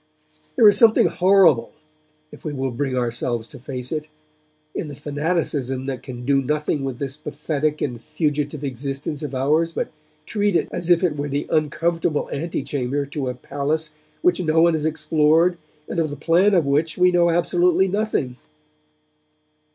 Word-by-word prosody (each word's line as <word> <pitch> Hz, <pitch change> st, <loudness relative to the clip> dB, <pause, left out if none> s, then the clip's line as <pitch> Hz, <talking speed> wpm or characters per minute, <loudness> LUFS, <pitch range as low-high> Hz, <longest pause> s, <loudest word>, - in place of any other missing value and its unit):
There 220 Hz, -, +7 dB
is 205 Hz, 0 st, +6 dB
something 225 Hz, -1 st, +6 dB
horrible, 180 Hz, -10 st, +4 dB, 0.6 s
if -, -, -14 dB
we 155 Hz, -, -4 dB
will 135 Hz, -1 st, -2 dB
bring 130 Hz, +1 st, -2 dB
ourselves 120 Hz, -1 st, -1 dB
to -, -, -12 dB
face 125 Hz, 0 st, -5 dB
it, 155 Hz, -1 st, -3 dB, 0.7 s
in -, -, -4 dB
the 145 Hz, -, -8 dB
fanaticism 145 Hz, -3 st, -2 dB
that 135 Hz, -2 st, -4 dB
can 125 Hz, -2 st, -8 dB
do 135 Hz, 0 st, +3 dB
nothing 150 Hz, +1 st, -1 dB
with 135 Hz, -3 st, -3 dB
this 135 Hz, +1 st, -5 dB
pathetic 150 Hz, 0 st, -2 dB
and 120 Hz, -4 st, -3 dB
fugitive 150 Hz, -2 st, -2 dB
existence 140 Hz, +3 st, -4 dB
of 145 Hz, -3 st, -5 dB
ours 155 Hz, +6 st, +1 dB
but -, -, -3 dB, 0.3 s
treat 205 Hz, -1 st, 0 dB
it -, -, +1 dB
as 175 Hz, 0 st, -4 dB
if 175 Hz, +1 st, +4 dB
it 170 Hz, -5 st, +1 dB
were 145 Hz, 0 st, -3 dB
the 145 Hz, +1 st, -2 dB
uncomfortable 160 Hz, +1 st, 0 dB
ante 155 Hz, 0 st, -3 dB
chamber 140 Hz, 0 st, -2 dB
to 140 Hz, -2 st, -4 dB
a 125 Hz, -, -4 dB
palace 150 Hz, +4 st, -2 dB, 0.3 s
which 180 Hz, 0 st, +3 dB
no 160 Hz, -1 st, +2 dB
one 170 Hz, 0 st, +5 dB
has 155 Hz, -1 st, 0 dB
explored 160 Hz, +2 st, +2 dB, 0.3 s
and 170 Hz, -, -3 dB
of 160 Hz, -2 st, +1 dB
the 145 Hz, -, -5 dB
plan 175 Hz, +7 st, +3 dB
of 170 Hz, -5 st, +3 dB
which 150 Hz, +3 st, 0 dB
we 180 Hz, 0 st, +5 dB
know 175 Hz, -1 st, +3 dB
absolutely 175 Hz, +2 st, +2 dB
nothing. 190 Hz, -, -1 dB
150 Hz, 170 wpm, -22 LUFS, 135-170 Hz, 0.7 s, There